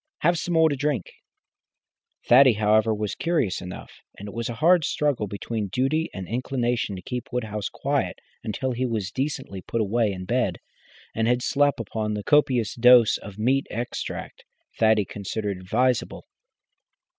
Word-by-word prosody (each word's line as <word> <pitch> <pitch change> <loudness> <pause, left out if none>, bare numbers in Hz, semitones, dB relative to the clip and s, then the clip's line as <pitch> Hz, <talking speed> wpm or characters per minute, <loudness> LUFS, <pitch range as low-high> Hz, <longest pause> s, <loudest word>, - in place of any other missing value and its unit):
Have 170 +1 +2
some 175 +1 -2
more 160 0 +6
to 145 - 0
drink." 140 - -2 1.2
Thaddy, 130 0 +7
however, 110 +1 +3
was 105 -1 -2
curious 160 - -1
enough, 90 0 -8 0.3
and 100 - -8
it 100 - -8
was 115 0 -3
a 120 - -4
hard 165 +6 +4
struggle 140 -8 0
between 105 +2 -4
duty 135 - 0
and 95 -2 -7
inclination 120 -3 -1
to 90 - -9
keep 125 -1 -5
Woodhouse 105 -4 -3
quiet - - -2 0.3
until 130 +5 -2
he 125 +1 -1
was 105 -5 -3
decently 130 -8 -4
put 115 - -3
away 110 0 +1
in 90 -1 -6
bed, 120 -6 0 0.6
and 110 0 0
had 125 +1 +1
slept 145 -2 +2
upon 105 -1 -3
the 105 - -4
copious 130 -6 +2
dose 120 -1 +6
of 100 -1 -10
meat 130 +5 +1
extract 120 +3 -5 0.4
Thaddy 110 -2 +4
considered 100 -1 -4
advisable. 120 +7 0
115 Hz, 155 wpm, -25 LUFS, 105-130 Hz, 1.2 s, Thaddy